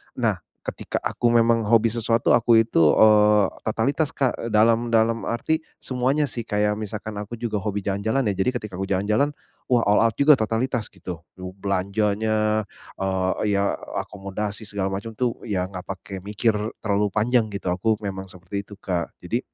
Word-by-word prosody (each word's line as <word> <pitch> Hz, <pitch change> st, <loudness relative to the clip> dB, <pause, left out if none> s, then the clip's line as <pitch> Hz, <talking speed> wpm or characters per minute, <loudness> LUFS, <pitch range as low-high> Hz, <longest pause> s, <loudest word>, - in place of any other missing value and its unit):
nah, -, -, 0 dB, 0.3 s
ketika -, -, -3 dB
aku 120 Hz, -, 0 dB
memang 115 Hz, -1 st, +4 dB
hobi 115 Hz, +1 st, +5 dB
sesuatu 115 Hz, 0 st, +1 dB
aku 115 Hz, -1 st, +5 dB
itu, 115 Hz, -, 0 dB, 0.2 s
eee, 105 Hz, -1 st, +6 dB, 0.2 s
totalitas 135 Hz, +8 st, 0 dB
Kak 130 Hz, -3 st, -1 dB
dalam 115 Hz, +2 st, +4 dB
dalam 115 Hz, 0 st, +2 dB
arti 155 Hz, +7 st, 0 dB, 0.2 s
semuanya 130 Hz, +4 st, +1 dB
sih, 120 Hz, -2 st, -4 dB
kayak 105 Hz, 0 st, +1 dB
misalkan 105 Hz, 0 st, -5 dB
aku 105 Hz, +3 st, -6 dB
juga 110 Hz, -3 st, -2 dB
hobi 105 Hz, 0 st, -2 dB
jalan-jalan 100 Hz, +7 st, 0 dB
ya. 100 Hz, -, +1 dB
Jadi, 125 Hz, -, +1 dB
ketika 105 Hz, -3 st, -8 dB
aku 95 Hz, -, -3 dB
jalan-jalan, 105 Hz, +9 st, +1 dB, 0.4 s
wah, 120 Hz, -, +5 dB
all 105 Hz, +2 st, +5 dB
out 115 Hz, -, +3 dB
juga 145 Hz, +1 st, +7 dB
totalitas 115 Hz, +1 st, -1 dB
gitu, 85 Hz, -2 st, -8 dB, 0.2 s
lu 95 Hz, 0 st, -7 dB
belanjanya, 105 Hz, +2 st, 0 dB, 0.3 s
eee, 95 Hz, +2 st, 0 dB
ya 100 Hz, 0 st, 0 dB
akomodasi, 105 Hz, +2 st, -5 dB
segala 100 Hz, -2 st, -2 dB
macam 110 Hz, +3 st, -5 dB
tuh 125 Hz, -1 st, -1 dB
ya 95 Hz, -2 st, -2 dB
enggak 90 Hz, 0 st, -8 dB
pakai 95 Hz, 0 st, -6 dB
mikir 105 Hz, +4 st, 0 dB, 0.3 s
terlalu 105 Hz, 0 st, +1 dB
panjang 115 Hz, +1 st, +2 dB
gitu 100 Hz, -3 st, -3 dB
aku 110 Hz, +5 st, +1 dB
memang 95 Hz, -1 st, -4 dB
seperti 95 Hz, +2 st, -7 dB
itu, 105 Hz, -, -11 dB
Kak. 90 Hz, -4 st, -3 dB
Jadi 110 Hz, +7 st, -1 dB
105 Hz, 165 wpm, -24 LUFS, 100-115 Hz, 0.4 s, juga